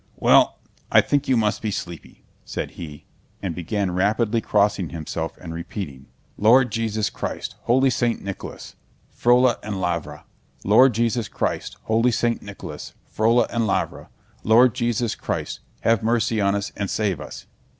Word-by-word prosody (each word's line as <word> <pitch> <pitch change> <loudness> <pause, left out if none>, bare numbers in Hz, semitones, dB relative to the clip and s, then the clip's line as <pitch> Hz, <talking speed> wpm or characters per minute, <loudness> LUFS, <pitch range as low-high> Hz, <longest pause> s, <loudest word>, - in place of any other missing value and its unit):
"Well, - - +4 0.3
I - - +7
think 145 0 +1
you 130 -2 +3
must 105 -2 +1
be 110 - -1
sleepy," 85 -5 -7 0.2
said - - -5
he, 75 -3 -9 0.4
and 95 -4 -2
began 90 +3 -2
rapidly 105 +5 +1
crossing 100 -5 +1
himself 80 0 -5
and 80 -2 -7
repeating: 80 -5 -7 0.3
"Lord 120 +3 +5
Jesus 110 -1 -1
Christ, - - -5
holy 130 +2 +4
Saint 120 -1 0
Nicholas, 100 -1 -7 0.4
Frola 125 +1 +4
and 105 -3 -4
Lavra! 85 -3 -3 0.4
Lord 115 +4 +5
Jesus 115 0 0
Christ, - - -3
holy 115 +2 +2
Saint 120 0 0
Nicholas, 100 -1 -9 0.2
Frola 115 +3 +4
and 115 -2 0
Lavra! 95 - -2 0.3
Lord 115 +2 +5
Jesus 120 -2 0
Christ, - - -4 0.2
have 115 -2 +2
mercy 115 -1 +1
on 100 0 +2
us 100 -1 -3
and 100 -2 -3
save 100 -8 -1
us!" 75 - -9
110 Hz, 150 wpm, -23 LUFS, 95-120 Hz, 0.4 s, I